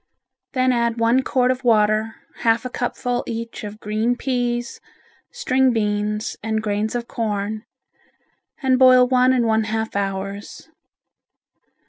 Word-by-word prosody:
Then 255 -1 +2
add 235 -1 0
one 230 +3 +3
quart 255 -1 +1
of 255 0 -4
water, 215 -1 +2 0.2
half 230 +1 +1
a 255 - -4
cupful 245 0 -2
each 230 -1 -5
of 210 0 -7
green 220 +3 -1
peas, 245 -2 -2 0.5
string 265 - +1
beans 210 -1 -1
and 220 0 -1
grains 210 +2 -1
of 240 -1 -3
corn, 215 -1 -3 1.0
and 260 -1 +3
boil 255 -1 +7
one 255 0 +4
and 250 -2 +2
one 220 -1 +2
half 220 0 -3
hours. 195 0 -4
230 Hz, 130 wpm, -21 LUFS, 215-250 Hz, 1.0 s, boil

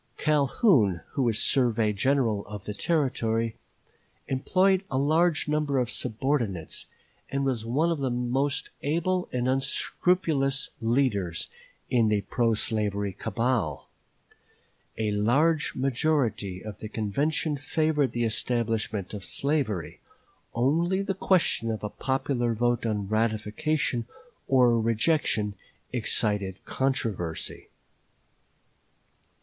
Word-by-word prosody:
Calhoun, 140 - +3
who 140 - -1
was 115 -4 +2
surveyor 115 -4 +2
general 115 -2 +1
of 105 -2 -7
the 105 - -4
Territory, 115 -5 0 0.7
employed 185 +8 +2
a 130 - -1
large 155 +4 +2
number 150 -2 0
of 125 -1 0
subordinates, 120 - -2 0.4
and 140 0 -1
was 120 -4 -1
one 155 +8 +2
of 165 - -1
the 135 -2 0
most 125 +3 -1
able 170 +5 0
and 125 0 -1
unscrupulous 135 +1 0
leaders 115 - 0 0.4
in 115 -3 +4
the 105 -1 +2
pro 115 +2 +1
slavery 100 -2 0
cabal. 115 +3 -1 1.1
A 110 -1 0
large 145 +10 +2
majority 125 - 0
of 105 -1 -7
the 110 - -6
convention 145 - -1
favored 150 -1 0
the 120 0 -1
establishment 110 -3 -1
of 100 -2 -6
slavery; 125 - -1 0.6
only 170 +10 +2
the 195 -1 -1
question 180 -12 +2
of 110 -1 -3
a 105 - -2
popular 130 -3 -1
vote 120 +1 +1
on 105 -3 -1
ratification 115 +4 0 0.4
or 125 -3 +4
rejection 110 -2 +1 0.4
excited 105 -5 0
controversy. 110 -11 -2
120 Hz, 110 wpm, -27 LUFS, 110-145 Hz, 1.1 s, in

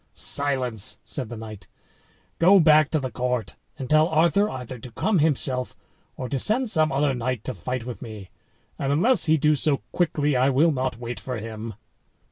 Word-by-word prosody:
"Silence!" 130 -7 +1
said 130 -6 -5
the 120 - -7
knight; 110 -4 -10 0.7
"go 190 +4 +6
back 155 -2 +5
to 155 - 0
the 130 -2 -5
court, 125 -2 -3 0.2
and 130 - -6
tell 155 +3 +4
Arthur 170 +6 +2
either 125 -1 -7
to 120 +2 -11
come 195 - 0
himself, 135 -4 +1 0.4
or 130 - -5
to 135 +1 -2
send 245 - +2
some 155 -4 +2
other 140 0 +1 0.2
to 125 +3 -6
fight 120 +6 -5
with 120 -5 -7
me; 110 -5 -9 0.5
and 140 0 -1
unless 220 - +3
he 160 -1 +3
do 150 +1 +3
so 145 -1 +1
quickly, 150 -4 0
I 130 +2 +3
will 145 +5 +3
not 130 -4 -2
wait 120 0 -6
for 125 -2 -5
him." 110 0 -7
135 Hz, 180 wpm, -24 LUFS, 120-155 Hz, 0.7 s, go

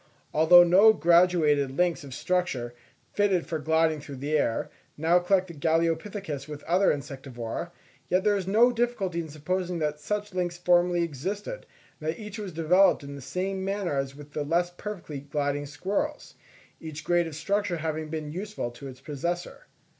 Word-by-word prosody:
Although 170 +3 +8
no 195 +6 +7
graduated 170 -6 +4
links 175 -3 +1
of 140 - -10
structure, 135 -11 -1 0.4
fitted 195 -4 +2
for 160 - -3
gliding 160 0 +2
through 145 -1 -8
the 145 +4 -2
air, 115 -6 0 0.3
now 165 +4 +4
connect 185 +1 +1
the - - -7
Galeopithecus 165 0 -1
with 150 -1 -7
the - - -9
other 190 +3 +4
Insectivora, 135 -1 -5 0.4
yet 185 +1 +2
there 210 -1 +3
is 190 -2 -3
no 230 +5 +5
difficulty 230 -7 -1
in 160 - -8
supposing 180 +4 -2
that 150 -2 -2
such 210 +6 -3
links 175 -1 -2
formerly 175 0 +3
existed, 190 - -5 0.3
and 155 -1 -3
that 160 - -3
each 210 0 -7
was 200 -3 -5
developed 175 +2 +4
in 140 0 -8
the 140 - -8
same 190 +6 -3
manner 195 -5 -1
as 135 0 -2
with 145 0 -12
the 150 - -2
less 170 +4 +1
perfectly 175 -6 -7
gliding 145 0 -2
squirrels; 195 - -3 0.5
each 160 -1 -7
grade 175 -1 +2
of 160 - -7
structure 190 +2 -1
having 155 -1 -3
been 155 -1 -4
useful 195 - -4
to 135 +4 -10
its 130 -1 -11
possessor. 175 - -4
170 Hz, 175 wpm, -27 LUFS, 150-185 Hz, 0.5 s, Although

